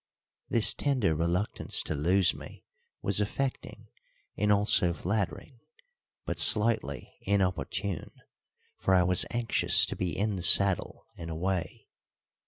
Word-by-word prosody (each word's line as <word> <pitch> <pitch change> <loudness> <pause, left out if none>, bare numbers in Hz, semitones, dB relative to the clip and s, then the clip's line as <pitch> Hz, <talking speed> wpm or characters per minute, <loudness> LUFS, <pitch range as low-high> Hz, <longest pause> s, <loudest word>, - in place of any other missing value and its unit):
This 115 -3 +2
tender 130 - -1
reluctance 85 +6 -1
to - - -5
lose 90 +5 +1
me - - -13 0.4
was 100 +1 +2
affecting 130 +6 -5 0.5
and 105 +1 0
also 100 -4 +2
flattering, 105 - -5 0.7
but - - -5
slightly 105 -9 +3
inopportune, 95 -2 -3 0.7
for 95 - +1
I 90 - +3
was 90 0 +1
anxious 120 -1 +2
to - - -6
be 90 -4 -4
in 105 -1 -2
the - - -6
saddle 95 +2 +4
and 85 -1 -9
away. 90 +2 -5
95 Hz, 120 wpm, -27 LUFS, 85-105 Hz, 0.7 s, saddle